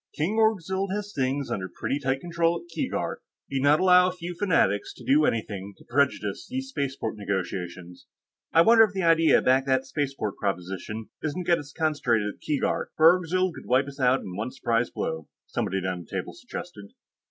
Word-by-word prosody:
"King 195 +9 0
Orgzild 195 -3 +1
has 205 0 -5
things 135 +1 -1
under 95 -1 -3
pretty 135 +10 -3
tight 135 -1 -1
control 170 0 0
at 175 - -17
Keegark. - - -2 0.3
He'd 135 -1 -1
not 145 +2 +5
allow 180 -1 +6
a - - -3
few 180 -1 -6
fanatics 165 - +1
to - - -13
do 150 +3 +4
anything 100 -5 -2
to - - -18
prejudice 120 -6 0
these 265 +1 -4
spaceport 135 - -3
negotiations." 90 -3 -4 0.4
"I 165 - +6
wonder 225 +3 +7
if 210 -3 +1
the 190 -1 -2
idea 165 -1 +5
back 130 +1 +3
of - - -16
that 130 0 +2
spaceport 135 -7 -3
proposition 95 +3 -4
isn't 160 +4 -3
to - - -14
get 170 - +4
us 145 0 -10
concentrated 125 -10 0
at - - -27
Keegark, 150 -2 -1
where 160 +1 +7
Orgzild 185 +1 0
could - - -11
wipe 130 +2 +3
us 140 0 -10
all 130 - +3
out 130 +2 +3
in 90 - -7
one 110 +5 -3
surprise 115 -1 0
blow," 80 -1 -4 0.2
somebody 95 - -2
down 90 -1 -3
the 85 - -11
table - - -5
suggested. 100 -1 -9
140 Hz, 200 wpm, -26 LUFS, 105-170 Hz, 0.4 s, wonder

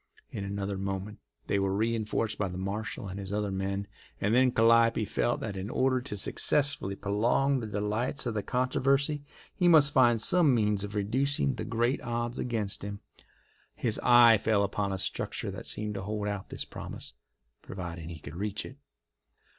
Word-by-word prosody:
In 100 - -4
another 100 0 -3
moment 95 +2 -4 0.3
they 100 - +1
were 95 0 0
reinforced 110 0 -1
by 100 - +1
the 90 0 -6
marshal 100 +2 -4
and 95 +1 -6
his 95 -1 -6
other 105 -1 -1
men, 95 +1 -2 0.3
and 105 +2 +1
then 130 +1 +5
Calliope 115 -1 +4
felt 120 +4 0
that 105 -3 -4
in 95 +2 -4
order 130 +1 +1
to 115 -5 -5
successfully 135 -1 0
prolong 120 +8 +1
the 115 - -5
delights 105 +7 -2
of 120 - -1
the 105 - -1
controversy 135 +5 +1 0.3
he 180 - +2
must 150 -4 +6
find 120 -3 +5
some 150 +3 +4
means 105 -3 +1
of 105 +1 -6
reducing 135 +7 +1
the 125 - -5
great 120 +2 0
odds 120 +1 -3
against 110 -6 -2
him. 100 0 -5 0.8
His 115 -3 -1
eye 120 -3 +7
fell 105 -1 +2
upon 100 0 -1
a 95 - -2
structure 95 - -3
that - - -6
seemed 105 0 -3
to 100 - -4
hold 105 +1 -3
out 100 -2 -4
this - - -4
promise, - - -6 0.5
providing 85 -3 -7
he 85 - -7
could 75 +1 -10
reach 105 +2 -3
it. 130 - -10
105 Hz, 180 wpm, -29 LUFS, 100-120 Hz, 0.8 s, eye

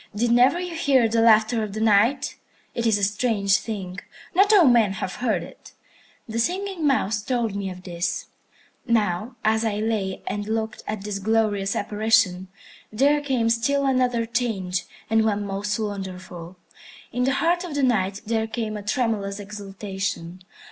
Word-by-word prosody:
Did 235 +3 +1
never 250 +8 +5
you 360 -1 -4
hear 275 -7 +3
the 225 +1 +1
laughter 225 0 +4
of 210 -2 -4
the 215 - -4
Night? 225 +5 +3 0.4
It 235 0 -1
is 220 -2 +3
a 200 - -3
strange 205 -1 +2
thing. 190 -5 -5 0.3
Not 395 +4 +5
all 395 -6 +7
men 235 -6 +4
have 190 -1 -5
heard 240 -3 +1
it. - - -14 0.5
The 225 0 -3
Singing 365 +3 -1
Mouse 220 -6 +1
told 230 -2 -1
me 200 -1 -3
of 185 0 -9
this. 175 -1 -3 0.6
Now 215 0 0
as 220 +1 +3
I 220 -2 0
lay 210 -3 -2
and 205 0 -3
looked 220 0 -2
at 210 -2 -4
this 205 -1 -3
glorious 205 -2 +1
apparition, 210 -3 +1 0.4
there 280 +7 +3
came 260 -5 0
still 280 +5 +1
another 250 -3 +1
change, 220 -6 -2 0.2
and 225 0 +3
one 205 -2 0
most 200 +1 -2
wonderful. 185 -4 -6 0.5
In 250 +1 0
the 265 - +2
heart 345 +5 +1
of 340 -5 -6
the 285 - 0
Night 205 -5 +1
there 225 0 0
came 220 -1 -3
a - - -6
tremulous 210 -2 -1
exultation. 195 -3 -5
220 Hz, 165 wpm, -24 LUFS, 200-245 Hz, 0.6 s, all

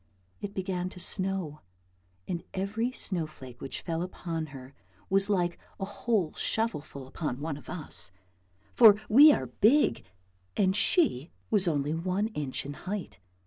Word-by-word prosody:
It 205 -1 -6
began 185 -1 -2
to 185 - -12
snow 185 -4 -2 0.7
and 175 -2 -3
every 210 +6 -1
snow 180 -10 -3
T 155 - -18
flake 125 -4 -12
which 135 - -5
fell 165 -1 -2
upon 170 -3 -4
her 135 -1 -11 0.4
was 195 +1 +4
like 175 -4 +1 0.2
a 195 - -2
whole 200 -3 -1
shovelful 155 - -2
upon 135 -1 -4
one 150 0 -3
of 145 - -12
us, 155 - 0 0.6
for 220 -4 +9
we 285 +8 +9
are - - 0
big 240 - +3 0.5
and 190 -2 +3
she 205 - +2 0.2
was 200 -4 +3
only 145 -2 0
one 185 +6 -1
inch 145 - -4
in 145 - -5 0.2
height. 195 - -4
180 Hz, 150 wpm, -29 LUFS, 150-205 Hz, 0.7 s, for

